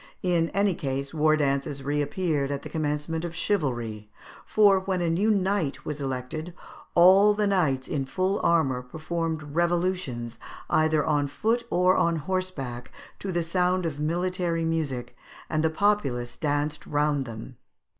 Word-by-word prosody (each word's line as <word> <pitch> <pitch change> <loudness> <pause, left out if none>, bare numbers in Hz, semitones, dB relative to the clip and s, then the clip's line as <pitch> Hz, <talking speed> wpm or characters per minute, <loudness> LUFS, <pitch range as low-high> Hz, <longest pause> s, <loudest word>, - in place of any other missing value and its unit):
In 170 -3 +2
any 200 0 +2
case, 140 -2 -3
war 155 0 +3
dances 140 -1 -1
reappeared 145 +1 0
at 140 -1 -3
the - - -7
commencement 155 +1 -2
of 170 -1 -5
chivalry; 120 - -1 0.4
for, 205 -3 +5
when 190 -1 -2
a 170 -1 +1
new 195 +6 +2
knight 195 -7 0
was 150 -1 -4
elected, 135 +6 -4 0.4
all 195 +4 +7
the 210 0 +1
knights 155 -10 +1
in 140 -3 -2
full 185 +8 0
armour 140 -7 +2
performed 160 +4 -3
evolutions, 170 -9 -1 0.3
either 155 -1 +3
on 145 -2 +1
foot 230 - 0
or 180 +1 +3
on 170 0 +2
horseback, 155 -8 -4 0.3
to 195 - -4
the 175 -1 0
sound 180 +2 +1
of 150 -3 -3
military 170 +1 -1
music, 155 -7 -2 0.4
and 155 - +1
the 160 - +2
populace 140 -11 0
danced 145 0 -2
round 145 -2 +1
them. 115 +2 -9
160 Hz, 145 wpm, -26 LUFS, 140-180 Hz, 0.4 s, all